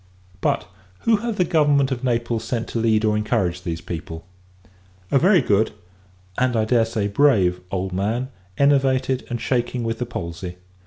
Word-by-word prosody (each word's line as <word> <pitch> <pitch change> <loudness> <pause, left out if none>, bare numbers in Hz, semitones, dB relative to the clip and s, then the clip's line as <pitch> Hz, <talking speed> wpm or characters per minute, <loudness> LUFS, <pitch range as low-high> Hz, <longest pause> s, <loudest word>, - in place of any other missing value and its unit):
But, - - 0 0.4
who 225 -1 +3
have 230 +1 -3
the 180 - +2
government 145 -4 +3
of 130 -1 -3
Naples 120 -2 0
sent 115 0 -3
to 115 - -2
lead 110 -1 +2
or 105 -1 +2
encourage 90 -4 0
these 85 -2 -4
people? 80 -1 -7 0.9
A 135 - +5
very 185 +3 +5
good 105 +2 +1 0.7
and, 125 -1 +2
I 110 -1 +2
dare 115 0 +3
say, 110 -2 -2
brave 100 -7 +3
old 95 -1 -3
man; 110 +7 -1 0.3
enervated, 135 -2 +2
and 120 -1 -3
shaking 120 0 -1
with 115 0 -2
the 125 - -2
palsy. 90 -4 -6
115 Hz, 165 wpm, -22 LUFS, 100-130 Hz, 0.9 s, A